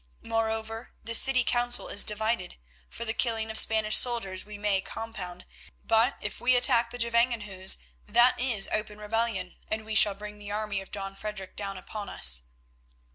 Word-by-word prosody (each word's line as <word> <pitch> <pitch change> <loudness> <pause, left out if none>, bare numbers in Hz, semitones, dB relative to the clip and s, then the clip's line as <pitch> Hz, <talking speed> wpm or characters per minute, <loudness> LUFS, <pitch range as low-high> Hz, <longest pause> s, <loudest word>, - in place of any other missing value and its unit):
Moreover, 225 0 -3
the 230 - -3
city 255 +2 +3
council 240 0 +3
is 205 - +4
divided. 215 -2 -2 0.3
For 235 - -7
the 225 - -2
killing 225 -2 -1
of - - -7
the - - +12
Spanish 220 -1 +3
soldiers 210 -7 +2
we 210 0 -11
may 205 -2 0
compound, 190 -5 -8 0.4
but 225 +1 +2
if - - -6
we 255 +1 +3
attack 240 -2 +3
the 245 - -8
Gevangenhuis, 230 -5 +1 0.3
that 240 +4 +3
is 235 -6 +2
open 210 -1 -3
rebellion, 210 -3 -3
and 215 0 -4
we 220 - -6
shall 210 -2 +5
bring 210 +1 -10
the 205 0 -9
army 205 -1 -3
of 195 - -13
Don 195 -1 -6
Frederic 195 -2 -7
down 195 -1 -5
upon 205 +2 -8
us." - - +4
215 Hz, 175 wpm, -27 LUFS, 200-230 Hz, 0.4 s, the